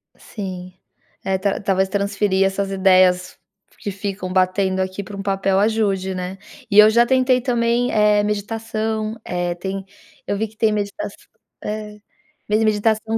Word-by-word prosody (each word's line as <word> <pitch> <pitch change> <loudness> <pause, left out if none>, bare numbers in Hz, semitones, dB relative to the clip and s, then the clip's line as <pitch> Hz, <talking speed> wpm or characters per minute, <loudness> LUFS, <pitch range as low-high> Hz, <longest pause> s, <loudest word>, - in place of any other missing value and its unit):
Sim. 185 -3 -7 0.5
É, 190 0 0
tal 195 +1 -1
talvez 190 -1 +1
transferir 200 -1 +1
essas 195 0 -1
ideias 185 -1 +3 0.4
que 205 - -4
ficam 195 -1 -5
batendo 185 +1 +1
aqui 190 +1 -2
para 200 +1 -9
um 200 - -5
papel 195 -1 +1
ajude, 200 -3 +1
né. 185 +1 -5 0.3
E 200 - +6
eu 210 0 +9
já 235 +2 +4
tentei 255 0 +3
também, 240 -1 +1
eh, 210 -1 +3
meditação. 220 +1 -2
Eh, 175 -1 -2
tem 190 +2 -5 0.4
eu 200 - -2
vi 220 +2 -1
que 220 +1 -22
tem 220 -1 +3
meditaç 205 +6 -3 0.5
eh, 210 0 -5 0.5
medi 215 +1 +2
meditação 220 +1 +1
200 Hz, 150 wpm, -21 LUFS, 190-215 Hz, 0.5 s, eu